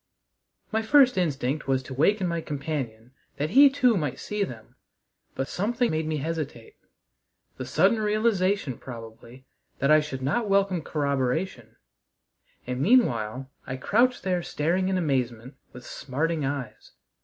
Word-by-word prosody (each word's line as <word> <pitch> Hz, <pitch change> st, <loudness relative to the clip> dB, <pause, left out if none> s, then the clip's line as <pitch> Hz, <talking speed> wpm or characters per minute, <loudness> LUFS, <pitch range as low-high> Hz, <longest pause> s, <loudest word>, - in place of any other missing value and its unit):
My 220 Hz, 0 st, +1 dB
first 255 Hz, +2 st, +5 dB
instinct 150 Hz, -5 st, -1 dB
was 130 Hz, -1 st, +1 dB
to 130 Hz, -, -8 dB
waken 185 Hz, +8 st, +2 dB
my 170 Hz, -1 st, -2 dB
companion 135 Hz, -7 st, -5 dB, 0.3 s
that 150 Hz, +2 st, -2 dB
he 280 Hz, +2 st, +8 dB
too 260 Hz, -4 st, +3 dB
might 150 Hz, -8 st, -2 dB
see 210 Hz, -1 st, -2 dB
them, 115 Hz, -, -8 dB, 0.6 s
but 135 Hz, -, -2 dB
something 235 Hz, -, 0 dB
made 155 Hz, 0 st, -1 dB
me 155 Hz, -1 st, -1 dB
hesitate 160 Hz, -, -5 dB, 0.8 s
the -, -, -6 dB
sudden 230 Hz, -, +3 dB
realization, 205 Hz, -, 0 dB
probably, 120 Hz, +1 st, -11 dB, 0.3 s
that 140 Hz, +2 st, +2 dB
I 155 Hz, -, +7 dB
should 135 Hz, -4 st, -5 dB
not 200 Hz, -, 0 dB
welcome 195 Hz, -3 st, +2 dB
corroboration; 140 Hz, -, -2 dB, 0.9 s
and 125 Hz, +1 st, -3 dB
meanwhile 135 Hz, -, +2 dB, 0.2 s
I 130 Hz, -, -4 dB
crouched 240 Hz, -, +2 dB
there 180 Hz, -2 st, 0 dB
staring 175 Hz, +4 st, 0 dB
in 190 Hz, -, +1 dB
amazement 130 Hz, -6 st, -1 dB, 0.2 s
with 125 Hz, -, -12 dB
smarting 155 Hz, +4 st, -2 dB
eyes. 135 Hz, -3 st, -5 dB
155 Hz, 140 wpm, -26 LUFS, 130-200 Hz, 0.9 s, he